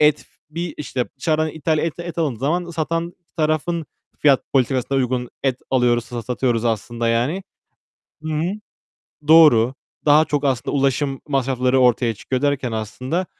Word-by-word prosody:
et 150 -1 +5
f - - -18 0.2
bir, 170 +2 -4
işte, 130 -4 -2
dışarıdan 155 +1 +1
ithal 155 0 -1
et 165 -1 -1
et 170 -1 -6
alındığı 145 -9 0
zaman 170 +5 -1
satan 165 +1 -2 0.2
tarafın 155 +1 0 0.3
fiyat 140 -3 +4
politikasına 135 0 +1
uygun 125 -1 -1
et 130 -2 0
alıyoruz, 120 -2 +2
sa 120 0 -6
satıyoruz 120 -1 -1
aslında 115 +1 -1
yani. 125 +12 0 0.8
Hı 160 - -4
hı. 155 +1 0 0.8
Doğru. 135 -7 +7 0.3
Daha 150 +2 +6
çok 145 -2 -1
aslında 130 +1 0
ulaşım 135 0 0
masrafları 130 -2 +1
ortaya 120 -2 +3
çıkıyor 130 +5 -3
derken 140 -4 0
aslında, 125 - -3
135 Hz, 150 wpm, -21 LUFS, 125-155 Hz, 0.8 s, Doğru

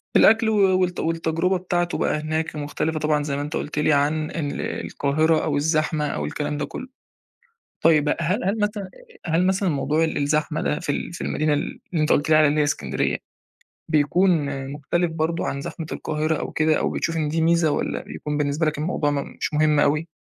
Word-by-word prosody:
الأكل 225 0 +6
و 195 -3 +3
والت 180 -1 0
والتجربة 165 +3 0
بتاعته 175 -1 -1
بقى 150 - 0
هناك 155 +1 -2
مختلِفة 150 +2 -2
طبعًا 150 -1 +1
زي 145 -1 -2
ما 140 - -2
أنت 150 +2 -5
قُلت 150 0 -3
لي 150 +1 +3
عن 150 +2 +1
ال 145 -4 -3 0.2
القاهرة 155 +3 +1
أو 145 -2 0
الزحمة 155 0 +1
أو - - -3
الكلام 150 0 -3
ده 145 - -2
كلّه. 260 - -7 1.0
طيب 155 -3 +5
بقى 150 - +1
هل 185 +9 0
هل 200 +3 0
مثلًا 210 -1 -1 0.4
آآ، - - -3
هل 180 +2 +3
مثلًا 190 0 +1
موضوع 150 +1 +1
ال 160 - -2
الزحمة 150 +2 0
ده 150 - 0
في 160 -5 -1
ال 165 - -4
في 175 - -8
المدينة 155 0 0
اللي 145 - -3
أنت 155 -2 +2
قُلت 145 - +1
لي 155 - +7
عليها 150 0 +4
إسكندرية 75 - -1 0.7
بيكون 155 +5 +3 0.4
مختلِف 160 +4 -1
برضه 165 +1 -1
عن 140 - -3
زحمة 160 +3 -6
القاهرة 155 +1 -1
أو - - -4
كده 155 0 +2
أو - - 0
بتشوف 165 0 -2
إن 150 -2 0
دي 160 +1 0
ميزة 165 -1 +3
والّا - - -2
بيكون 150 0 -5
بالنسبة 150 +2 0
لك 155 -1 0
الموضوع 150 -1 0
م - - -1 0.2
مش - - -3
مهم 150 -1 +3
أوي؟ 150 +3 +2
155 Hz, 200 wpm, -23 LUFS, 150-165 Hz, 1.0 s, لي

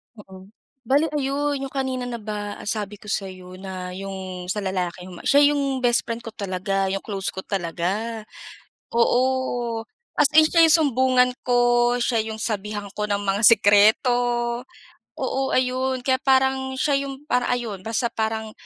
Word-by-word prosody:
Mm. 190 -3 -13 0.4
Bale 285 +4 +2
ayon 280 +1 -1
'yong 270 0 -6
kanina 260 -2 -2
na 245 - -4
ba 210 -2 -5
sabi 210 -1 -3
ko 210 0 -8
sa'yo 185 -2 -5
na 185 -1 -6
'yong 190 -1 -7
sa 205 +3 -2
lalaki 180 -2 -3
'yong 180 -1 -10
ma - - -12
siya 285 +1 +6
'yong 275 -3 -1
best 240 -1 +2
friend 230 0 -4
ko 225 - -7
talaga 195 -1 -2
'yong 195 +1 -3
close 195 -2 -3
ko 190 - -3
talaga. 195 +5 -3 0.7
Oo. 245 -1 +1 0.4
As 285 - +5
in 310 0 +8
siya 335 +1 +4
'yong 320 0 +7
sumbungan 255 -3 +3
ko, 245 0 +3
siya 235 -2 +1
'yong 220 0 -6
sabihan 210 -1 -3
ko 210 - -2
ng 200 0 +1
mga 200 +1 0
sikreto. 210 +2 +5 1.1
Oo 270 0 -1
ayon 255 0 0
kaya 260 -1 +3
parang 265 0 +2
siya 290 - +1
'yong 275 +1 -8
parang 250 0 +1
ayon 235 -5 -2
basta 225 +2 -1
parang 220 0 -2
225 Hz, 160 wpm, -23 LUFS, 195-260 Hz, 1.1 s, in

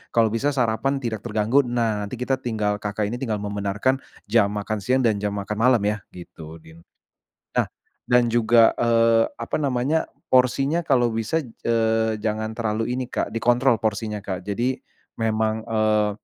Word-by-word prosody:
kalau 115 -2 +4
bisa 140 +5 0
sarapan 125 +2 +1
tidak 115 -4 -3
terganggu. 110 +4 +2
Nah, 115 -4 0
nanti 115 - -6
kita 130 +2 -1
tinggal 105 -4 -1
Kakak, 105 +1 -3
ini 120 - -4
tinggal 120 -5 -2
membenarkan 105 +5 -1 0.3
jam 115 -3 +5
makan 105 +1 -3
siang 130 +6 +1
dan 110 -4 +2
jam 105 0 -2
makan 105 +1 -4
malam 120 -1 +4
ya, 105 +1 +1 0.2
gitu, 80 -2 -10
nih. 80 +1 -15 0.8
Nah, - - -1 0.4
dan 125 0 +5
juga, 115 0 +5
eee, 115 -1 +4
apa - - -3
namanya, 140 +3 0 0.2
porsinya 135 +5 +3
kalau 130 -8 +2
bisa, 115 +8 -1
eee, 110 -2 0
jangan 110 +1 -3
terlalu 110 -1 -1
ini, 130 - -2
Kak, - - -1
dikontrol 120 +2 +2
porsinya, 105 -1 -3
Kak. 95 -2 -4
Jadi 105 +7 -1 0.5
memang, 110 0 0
eee, 110 -1 +2
115 Hz, 160 wpm, -23 LUFS, 105-125 Hz, 0.8 s, jam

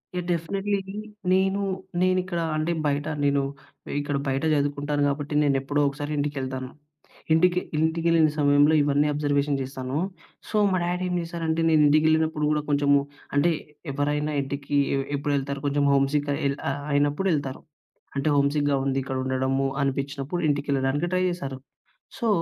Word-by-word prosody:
Yeah! 180 -1 -2
Definitely 195 +4 -1 0.5
నేనూ, 190 +2 +2 0.4
నేనిక్కడ 185 -1 +1 0.2
అంటే 155 +2 0 0.2
బయట 145 +1 -1 0.2
నేను, 140 0 +3 0.6
ఇక్కడ 145 0 -2
బయట 135 +1 0
చదువుకుంటాను 145 0 0
గాబట్టి 145 +1 -2
నేనెప్పుడో 140 +1 +1
ఒకసారి 145 +2 -5
ఇంటికెళ్తాను. 130 -3 -3 0.6
ఇంటికి 175 +2 +4 0.2
ఇంటికెళ్ళిన 160 0 +3
సమయంలో 145 +1 +4
ఇవన్నీ 145 +1 +2
అబ్జర్వేషన్ 145 -1 +1
జేస్తాను. 130 +1 -4 0.5
సో, - - -5 0.2
మా 185 - +2
డాడీ 180 +1 -1
ఏం 180 - -1
చేశారంటే 165 -1 -2
నేను 155 -1 +5
ఇంటికెళ్ళినప్పుడు 155 +1 +3
గూడా 150 0 +1
కొంచెము 145 0 +4 0.4
అంటే 160 +5 +4 0.4
ఎవరైనా 145 +2 -1
ఇంటికి 140 +1 -4 0.2
ఎ - - +1 0.2
ఎప్పుడెళ్తారు? 140 -1 -1
కొంచెము 145 0 +2
హోమ్ 135 0 +3
సిక్ 145 -1 0 0.2
ఎల్ 140 0 +1 0.4
అయినప్పుడెళ్తారు. 145 -1 0 0.6
అంటే 140 +2 +1
హోమ్ 140 0 +3
సిక్‌గా 145 -1 +2
ఉంది. 135 0 0
ఇక్కడుండడము 130 +1 -1 0.2
అనిపిచ్చినప్పుడు 140 +4 -2
ఇంటికెళ్ళడానికి 140 +2 0
ట్రై 185 - +2
జేస్తారు. 140 -7 -4 0.6
సో, 235 - 0
145 Hz, 130 wpm, -25 LUFS, 140-160 Hz, 0.6 s, నేను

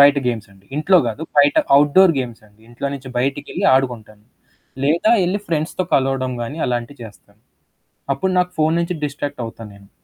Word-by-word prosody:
బయట 140 0 +7
గేమ్స్ 110 -4 -4
అండి. 95 0 -23
ఇంట్లో 180 +5 +4
గాదు. 115 +8 -6 0.2
బయట 145 0 +5 0.2
అవుట్‌డోర్ 155 +5 +5
గేమ్స్ 120 -3 -7
అండి. 105 +1 -28
ఇంట్లో 120 +3 -5
నుంచి 135 -1 -9
బయటికెళ్ళి 140 +3 -2
ఆడుకుంటాను. 115 -5 -2 0.6
లేదా 170 +9 +2 0.2
ఎళ్లి 195 +3 -1
ఫ్రెండ్స్‌తో 165 +3 -1
కలవడం 130 -1 0
గాని 120 +6 -6
అలాంటివి 120 +2 -4
చేస్తాను. 105 -1 -16 0.7
అప్పుడు 190 +4 -1
నాకు 180 0 -1
ఫోను 155 +1 +2
నుంచి 170 +1 -2
డిస్ట్రాక్టవుతా 140 -6 -5
నేను. 100 0 -18
140 Hz, 155 wpm, -19 LUFS, 115-155 Hz, 0.7 s, బయట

